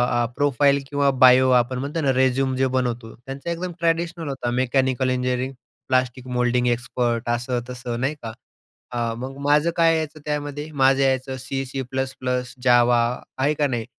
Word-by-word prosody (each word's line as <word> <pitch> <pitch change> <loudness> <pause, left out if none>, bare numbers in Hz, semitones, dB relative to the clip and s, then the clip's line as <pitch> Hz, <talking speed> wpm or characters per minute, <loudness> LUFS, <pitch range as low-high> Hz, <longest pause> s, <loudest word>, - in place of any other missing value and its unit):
अ, 120 0 +2
profile 140 0 +2
किंवा 140 -1 +2 0.2
bio 130 +1 +6
आपण 125 +2 -5
म्हणतो 145 +5 -3
ना, 135 -3 +2
रेझ्युमे 130 0 +1
जे 130 0 +2
बनवतो 120 -2 -2
त्यांचा 135 +6 -8
एकदम 175 +2 -4
ट्रॅडिशनल 165 0 -1
होता. 135 -3 -3
Mechanical 130 0 +1
engineering, 125 +1 -1 0.3
plastic 130 0 0
moulding 125 0 +2
expert 120 0 -1
असं-तसं. 120 0 -3
नाही 135 +4 -1
का. 115 - -4 0.6
अ, 120 -2 -1
मग 130 +3 -6
माझं 150 +3 +3
काय 165 -1 +4
यायचं 155 -1 -4
त्यामध्ये, 145 0 -4
माझं 135 -1 +3
यायचं 130 0 0
सी, 135 +1 -4
सी-प्लस-प्लस, 130 -1 -3
जावा 120 -1 +5 0.4
आहे 140 +3 +2
का 150 -1 +1
नाही. 120 -4 -3
130 Hz, 155 wpm, -23 LUFS, 125-140 Hz, 0.6 s, bio